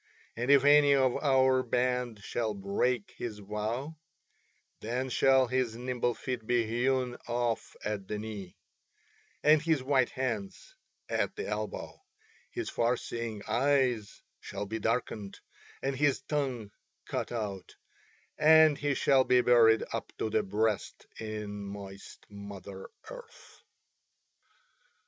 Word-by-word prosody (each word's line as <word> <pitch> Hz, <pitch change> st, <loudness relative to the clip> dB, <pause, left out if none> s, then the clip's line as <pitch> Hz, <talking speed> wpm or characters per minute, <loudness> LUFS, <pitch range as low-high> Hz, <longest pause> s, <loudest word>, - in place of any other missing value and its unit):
And 120 Hz, +3 st, -3 dB
if 140 Hz, -1 st, +6 dB
any 145 Hz, -1 st, +6 dB
of 130 Hz, -2 st, +3 dB
our 130 Hz, -2 st, +3 dB
band 125 Hz, -3 st, -1 dB
shall 110 Hz, -2 st, -2 dB
break 100 Hz, +4 st, -1 dB
his 115 Hz, -3 st, -4 dB
vow 110 Hz, +9 st, -4 dB, 0.8 s
then 125 Hz, +4 st, -3 dB
shall 135 Hz, +1 st, +4 dB
his 125 Hz, -2 st, -1 dB
nimble 120 Hz, -1 st, -1 dB
feet 125 Hz, -4 st, -5 dB
be 120 Hz, -2 st, +2 dB
hewn 125 Hz, +2 st, 0 dB
off 120 Hz, -1 st, -2 dB
at 105 Hz, -2 st, -3 dB
the 105 Hz, -, -3 dB
knee, 105 Hz, -4 st, -7 dB, 0.9 s
and 150 Hz, 0 st, +6 dB
his 160 Hz, -4 st, +1 dB
white 130 Hz, -2 st, +2 dB
hands 195 Hz, -, -4 dB, 0.3 s
at -, -, -1 dB
the 435 Hz, +2 st, -4 dB
elbow, -, -, -5 dB, 0.5 s
his 355 Hz, -2 st, -5 dB
far 120 Hz, +1 st, +1 dB
seeing 115 Hz, -4 st, -5 dB
eyes 125 Hz, -2 st, +1 dB, 0.2 s
shall -, -, -6 dB
be 110 Hz, +3 st, -4 dB
darkened, 110 Hz, -3 st, -2 dB, 0.4 s
and 135 Hz, 0 st, -1 dB
his 145 Hz, 0 st, +2 dB
tongue 130 Hz, -9 st, -2 dB, 0.3 s
cut -, -, -3 dB
out, 105 Hz, -5 st, -5 dB, 0.6 s
and 155 Hz, -1 st, +6 dB
he 145 Hz, -1 st, 0 dB
shall 135 Hz, -1 st, +4 dB
be 125 Hz, -1 st, +4 dB
buried 115 Hz, -2 st, +5 dB
up -, -, -4 dB
to 110 Hz, -, -2 dB
the 110 Hz, 0 st, +2 dB
breast 105 Hz, +1 st, -1 dB
in 105 Hz, -2 st, -5 dB
moist 100 Hz, -1 st, -9 dB
Mother 100 Hz, -1 st, -9 dB, 0.2 s
Earth." -, -, -13 dB
120 Hz, 125 wpm, -30 LUFS, 105-135 Hz, 0.9 s, if